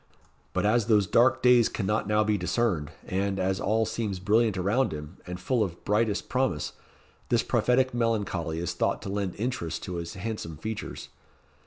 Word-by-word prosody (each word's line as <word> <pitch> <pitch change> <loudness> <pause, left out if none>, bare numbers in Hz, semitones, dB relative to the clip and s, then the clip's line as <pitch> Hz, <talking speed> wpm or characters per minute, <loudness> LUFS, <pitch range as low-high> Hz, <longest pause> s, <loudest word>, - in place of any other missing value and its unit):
But 90 - 0
as 110 +1 +3
those 105 -3 +4
dark 130 +7 +3
days 125 -2 +6
cannot 105 0 -1
now 105 0 +3
be 105 0 +1
discerned, 90 -5 0 0.2
and, 95 +1 -1
as 95 0 0
all 110 +2 +1
seems 105 -3 -2
brilliant 105 +2 +2
around 105 +9 +1
him, 75 +3 -7
and 90 0 -5
full 115 +5 +1
of 90 -4 -6
brightest 105 0 +1
promise, 130 -12 -1 0.6
this 120 - +3
prophetic 125 +2 +2
melancholy 100 -9 -1
is 85 +1 -2
thought - - -1
to - - -5
lend 100 -2 -2
interest 110 -7 -3
to 90 -2 -4
his 85 0 -5
handsome 95 -5 -5
features. 110 +7 -6
105 Hz, 170 wpm, -27 LUFS, 90-115 Hz, 0.6 s, days